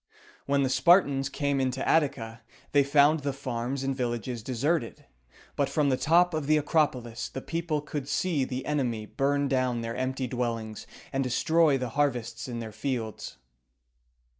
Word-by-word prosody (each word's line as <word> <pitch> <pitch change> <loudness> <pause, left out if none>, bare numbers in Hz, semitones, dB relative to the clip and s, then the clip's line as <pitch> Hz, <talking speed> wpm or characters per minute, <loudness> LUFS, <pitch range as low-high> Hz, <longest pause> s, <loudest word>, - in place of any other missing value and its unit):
When 140 0 +2
the 130 - +1
Spartans 135 -1 +4
came 140 -1 0
into 130 0 -1
Attica, 130 -8 +1 0.3
they 145 -1 +5
found 145 +2 +4
the 140 0 -2
farms 130 0 -3
and 135 0 -1
villages 120 -2 -3
deserted; 130 +3 -1 0.5
but 140 - +1
from 150 -3 +1
the 130 - +3
top 175 +5 +3
of 155 -3 -2
the 155 0 +4
Acropolis 135 -6 0
the - - -5
people 165 +1 -2
could 145 -2 -5
see 145 0 0
the 130 0 -4
enemy 125 -7 -1
burn 140 +4 0
down 130 -3 0
their 115 0 -4
empty 130 0 -2
dwellings 115 -3 -3 0.3
and 135 0 +1
destroy 155 +4 +3
the 125 -2 -3
harvests 120 -3 -1
in 120 -2 -5
their 115 -2 -5
fields. 115 -2 -4
135 Hz, 160 wpm, -28 LUFS, 120-145 Hz, 0.5 s, they